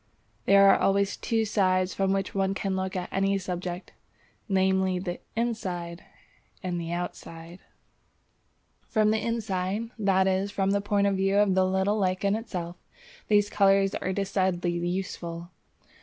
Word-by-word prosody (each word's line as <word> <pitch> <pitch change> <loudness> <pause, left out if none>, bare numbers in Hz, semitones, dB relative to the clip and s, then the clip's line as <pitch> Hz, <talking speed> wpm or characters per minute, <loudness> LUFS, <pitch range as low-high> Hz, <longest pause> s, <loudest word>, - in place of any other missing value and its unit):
There 200 0 +6
are - - +6
always 200 0 +2
two 225 -1 -1
sides 185 -3 +1
from 195 -1 0
which 195 0 -1
one 195 0 0
can 195 -1 -2
look 190 0 -3
at 180 -1 -3
any 195 +1 +1
subject, 180 -1 -5 0.6
namely 190 -1 +2
the 180 -1 -4 0.2
inside 185 -7 -3 0.6
and 175 -2 -2
the 165 0 -5
outside. 170 0 -6 1.3
From 215 -2 +2
the 220 -1 0
inside 220 -1 -2
(that 190 -2 +3
is 190 +1 +1
from 195 -1 0
the 200 0 +1
point 205 0 +1
of 200 -1 +1
view 195 +1 +1
of 205 -2 +4
the 185 0 +3
little 190 +3 +1
lichen 195 +1 +1
itself) 180 -6 -5 0.5
these 205 -1 +4
colours 195 -1 +3
are 185 - -2
decidedly 190 -2 0
useful. 175 -1 -4
190 Hz, 145 wpm, -27 LUFS, 185-200 Hz, 1.3 s, There